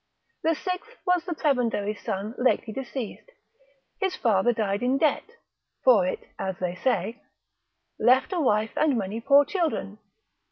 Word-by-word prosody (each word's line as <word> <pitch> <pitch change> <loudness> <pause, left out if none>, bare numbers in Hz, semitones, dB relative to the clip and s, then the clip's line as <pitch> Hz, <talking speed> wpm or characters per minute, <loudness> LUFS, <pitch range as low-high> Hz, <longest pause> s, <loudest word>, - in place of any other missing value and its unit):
The 325 0 +2
sixth 375 +9 -5
was 360 -2 +2
the 350 -3 -3
prebendary's 230 -8 0
son 210 0 -3
lately 245 -3 +1
deceased, 265 - -6 0.7
his 380 -2 0
father 220 -1 +2
died 205 -3 -1
in 255 +2 +2
debt 315 +10 0 0.5
(for 220 -8 +5
it, - - -3 0.2
as 190 -1 -2
they 180 -1 -2
say), 240 +3 -1 0.8
left 260 +8 +4
a 360 - 0
wife 220 -4 +2
and 295 -5 +2
many 210 +2 -3
poor 280 +3 +6
children. 310 - -2
250 Hz, 145 wpm, -26 LUFS, 210-310 Hz, 0.8 s, poor